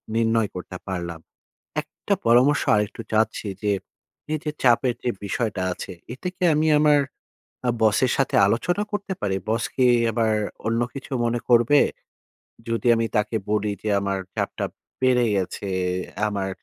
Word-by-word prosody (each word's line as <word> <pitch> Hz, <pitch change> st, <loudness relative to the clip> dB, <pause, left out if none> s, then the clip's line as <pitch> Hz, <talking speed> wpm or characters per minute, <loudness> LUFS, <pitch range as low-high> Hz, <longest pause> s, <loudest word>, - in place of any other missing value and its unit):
নির্ণয় 115 Hz, -2 st, +2 dB
করতে 90 Hz, 0 st, -6 dB
পারলাম। 85 Hz, -3 st, -4 dB, 0.6 s
একটা -, -, -3 dB
পরামর্শ 125 Hz, +5 st, +5 dB
আরেকটু 105 Hz, +2 st, -1 dB
চাচ্ছি 110 Hz, -1 st, +1 dB
যে 105 Hz, -1 st, +2 dB, 0.6 s
এইযে 155 Hz, 0 st, -2 dB
চাপের 120 Hz, 0 st, +4 dB
যে 120 Hz, -, +1 dB
বিষয়টা 100 Hz, -1 st, -2 dB
আছে, 95 Hz, -, -7 dB, 0.2 s
এটা 135 Hz, +8 st, -5 dB
কি 185 Hz, -, -11 dB
আমি 155 Hz, +1 st, +2 dB
আমার 150 Hz, -1 st, +5 dB, 0.7 s
আ -, -, +3 dB
বসের 110 Hz, +3 st, +3 dB
সাথে 135 Hz, -, +1 dB
আলোচনা 175 Hz, -, 0 dB
করতে 200 Hz, -1 st, -3 dB
পারি? 95 Hz, -2 st, 0 dB
বস 115 Hz, +1 st, +1 dB
কি 130 Hz, -, +3 dB, 0.3 s
আবার 110 Hz, -1 st, +1 dB, 0.3 s
অন্য 115 Hz, +1 st, +1 dB
কিছু 135 Hz, 0 st, -9 dB
মনে 120 Hz, +1 st, 0 dB
করবে? 120 Hz, +4 st, +6 dB, 0.9 s
যদি 115 Hz, +2 st, -1 dB
আমি 115 Hz, 0 st, +1 dB
তাকে 105 Hz, +2 st, 0 dB
বলি 105 Hz, 0 st, +1 dB
যে, 110 Hz, -, -1 dB
"আমার 100 Hz, -1 st, -1 dB, 0.2 s
চাপটা -, -, -2 dB, 0.4 s
বেড়ে 125 Hz, -2 st, +4 dB
গেছে, 95 Hz, +1 st, -2 dB, 0.6 s
আমার 100 Hz, -2 st, -2 dB
115 Hz, 145 wpm, -24 LUFS, 105-130 Hz, 0.9 s, করবে